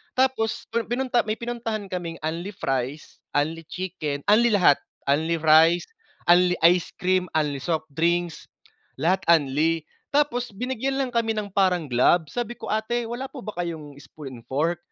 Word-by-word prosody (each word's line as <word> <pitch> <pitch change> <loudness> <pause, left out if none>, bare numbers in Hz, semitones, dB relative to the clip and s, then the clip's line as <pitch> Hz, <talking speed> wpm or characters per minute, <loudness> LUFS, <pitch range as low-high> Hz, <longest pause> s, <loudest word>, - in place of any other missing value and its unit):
Tapos 255 -4 +1
pu 235 +1 +1
pinunta 245 +1 0
may 215 - 0
pinuntahan 230 -3 -4
kaming 170 -2 -4
unli-fries, 155 -5 -3 0.2
unli-chicken, 160 -1 -3
unli 230 +3 +5
lahat, 175 -7 +5 0.3
unli-rice, 160 +3 +4 0.5
unli-ice 180 -1 +4
cream, 185 0 +1
unli-soft 155 +2 -1
drinks, 170 +2 0 0.5
lahat 175 +7 +2
unli. 160 +1 +3 0.3
Tapos 250 -4 +1
binigyan 255 +4 -2
lang 270 -2 0
kami 230 -1 +1
ng 210 -1 -3
parang 185 -4 +2
gloves, 145 +7 +3
sabi 240 -1 -2
ko, - - -7
"Ate, 230 +2 -1
wala 240 +3 -4
po 270 - -9
ba - - -4
kayong 155 -5 -6
spoon 135 -6 -10
and - - -31
fork?" 160 +6 0
175 Hz, 135 wpm, -24 LUFS, 155-225 Hz, 0.5 s, unli